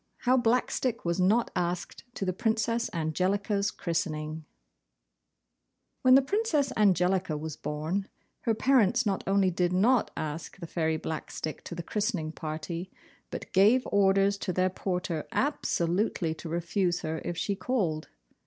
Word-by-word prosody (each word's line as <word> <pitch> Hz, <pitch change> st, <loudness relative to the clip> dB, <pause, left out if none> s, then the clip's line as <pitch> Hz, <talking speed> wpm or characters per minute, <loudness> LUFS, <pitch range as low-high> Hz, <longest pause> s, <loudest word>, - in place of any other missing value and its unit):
HOW 255 Hz, +1 st, +4 dB
BLACKSTICK 245 Hz, -1 st, +1 dB
WAS 170 Hz, +1 st, 0 dB
NOT 210 Hz, +6 st, +3 dB
ASKED 175 Hz, +5 st, -3 dB
TO 195 Hz, -, -2 dB
THE 185 Hz, -, 0 dB
PRINCESS 230 Hz, +2 st, 0 dB
ANGELICA'S 195 Hz, +5 st, 0 dB
CHRISTENING 155 Hz, -3 st, -3 dB, 1.6 s
When 255 Hz, 0 st, +7 dB
the 270 Hz, -, +6 dB
Princess 310 Hz, -, +1 dB
Angelica 185 Hz, -4 st, +2 dB
was 155 Hz, 0 st, -5 dB
born, 155 Hz, +7 st, -3 dB, 0.3 s
her 225 Hz, -, 0 dB
parents 245 Hz, -1 st, +3 dB
not 195 Hz, -2 st, 0 dB
only 195 Hz, -1 st, +3 dB
did 175 Hz, 0 st, +1 dB
not 220 Hz, +6 st, +3 dB
ask 155 Hz, +3 st, -5 dB
the 180 Hz, -, -7 dB
Fairy 160 Hz, -1 st, 0 dB
Blackstick 155 Hz, 0 st, -5 dB
to 170 Hz, -, -6 dB
the 170 Hz, -, -5 dB
christening 200 Hz, -6 st, -1 dB
party, 165 Hz, +3 st, -5 dB, 0.4 s
but -, -, -7 dB
gave 215 Hz, +7 st, +5 dB
orders 200 Hz, 0 st, +3 dB
to 185 Hz, -, -2 dB
their 185 Hz, +1 st, +1 dB
porter 180 Hz, -4 st, -3 dB
absolutely 180 Hz, -, 0 dB
to 160 Hz, -, -8 dB
refuse 175 Hz, +2 st, 0 dB
her 160 Hz, 0 st, -3 dB
if 175 Hz, -, -4 dB
she 200 Hz, +3 st, -1 dB
called. 185 Hz, -7 st, -1 dB
185 Hz, 140 wpm, -29 LUFS, 165-215 Hz, 1.6 s, When